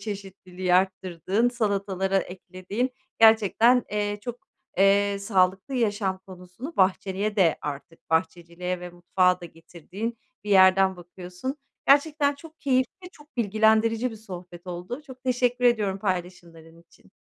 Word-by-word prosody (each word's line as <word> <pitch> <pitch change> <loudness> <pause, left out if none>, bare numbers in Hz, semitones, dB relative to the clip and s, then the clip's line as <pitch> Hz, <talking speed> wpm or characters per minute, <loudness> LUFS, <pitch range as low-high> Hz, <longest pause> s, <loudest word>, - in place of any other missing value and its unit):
çeşitliliği 190 -3 -4
arttırdığın, 190 +3 +1
salatalara 200 -4 0
eklediğin, 185 +6 -4 0.3
gerçekten, 225 +2 +5
eee, 205 0 -2
çok, 240 +2 -5 0.4
eee, 200 +1 +4
sağlıklı 195 +3 +1
yaşam 205 -5 0
konusunu 185 - -10
bahçeliye 195 +2 +1
de 175 -6 +3
artık 145 +3 -8
bahçeciliğe 170 +2 -2
ve 180 0 -7
mutfağa 180 +1 +1
da - - -9
getirdiğin 180 +7 -7 0.3
bir 210 - -5
yerden 190 0 +5
bakıyorsun. 180 - -7 0.3
Gerçekten 285 0 +4
çok 315 +2 -15
keyifli 260 -2 +1
ve - - -8
çok 295 -1 -20
bilgilendirici 220 +2 +2
bir 225 - -9
sohbet 180 -4 -10
oldu. 180 - -6
Çok 260 -1 -12
teşekkür 245 -1 0
ediyorum 210 -5 +2
paylaşımların 175 -4 -5
için. 170 - -25
195 Hz, 125 wpm, -25 LUFS, 180-225 Hz, 0.4 s, gerçekten